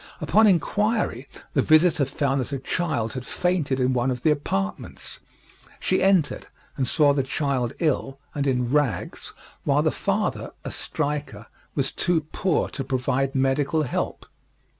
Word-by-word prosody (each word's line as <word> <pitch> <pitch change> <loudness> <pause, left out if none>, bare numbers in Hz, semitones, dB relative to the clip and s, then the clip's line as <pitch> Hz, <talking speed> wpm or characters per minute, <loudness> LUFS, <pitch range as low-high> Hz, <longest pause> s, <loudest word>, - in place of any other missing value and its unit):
Upon 220 +1 +4
inquiry 205 - +1 0.3
the - - +3
visitor 155 -2 +4
found 135 0 0
that 125 - -5
a 140 - -1
child 135 -5 -2
had 130 - -5
fainted 160 -5 0
in 130 0 +2
one 125 +1 +1
of 125 -1 -3
the 155 - +4
apartments. 95 -10 -3 0.6
She 185 - +1
entered, 190 -5 +2 0.3
and 130 -3 -1
saw 145 0 +4
the 140 - +1
child 130 -3 -1
ill 135 -4 0 0.2
and 140 -1 -1
in 125 -2 0
rags, 140 - -1 0.3
while - - +2
the - - +2
father, - - -2
a - - -4
striker, 145 -8 -3 0.3
was 135 -2 0
too 175 -3 +1
poor 185 -4 +1
to 135 - -5
provide 135 0 -1
medical 135 +4 +1
help. 125 - -3
140 Hz, 150 wpm, -24 LUFS, 130-155 Hz, 0.6 s, Upon